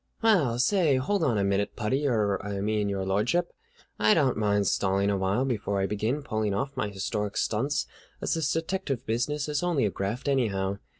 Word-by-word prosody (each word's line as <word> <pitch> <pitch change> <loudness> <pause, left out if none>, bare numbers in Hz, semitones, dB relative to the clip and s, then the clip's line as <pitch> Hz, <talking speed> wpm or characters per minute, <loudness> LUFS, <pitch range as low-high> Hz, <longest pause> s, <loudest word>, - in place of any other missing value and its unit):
"Well, 165 - +3
say, 155 +2 +3
hold 165 +9 0
on 120 -8 +2
a 100 - +1
minute, 100 +1 0
Puddy, 135 +7 0
er, 105 -6 +1
I 100 -1 -3
mean 105 0 0
Your 95 -1 -2
Lordship. 110 - 0 0.5
I 110 0 +5
don't 135 -6 +2
mind 105 -1 +1
stalling 100 +1 +1
awhile 100 +5 +1
before 105 -6 -1
I 95 - +1
begin 110 +8 -1
pulling 110 -6 -1
off 135 +7 -2
my - - -1
historic 105 +1 -3
stunts, 135 +7 0 0.3
as - - -1
this 160 -3 0
detective 165 -6 -2
business 140 +7 -1
is 150 -1 -1
only 175 -9 +1
a 100 - 0
graft 105 +10 -3
anyhow. 100 -8 0
110 Hz, 185 wpm, -27 LUFS, 100-140 Hz, 0.5 s, I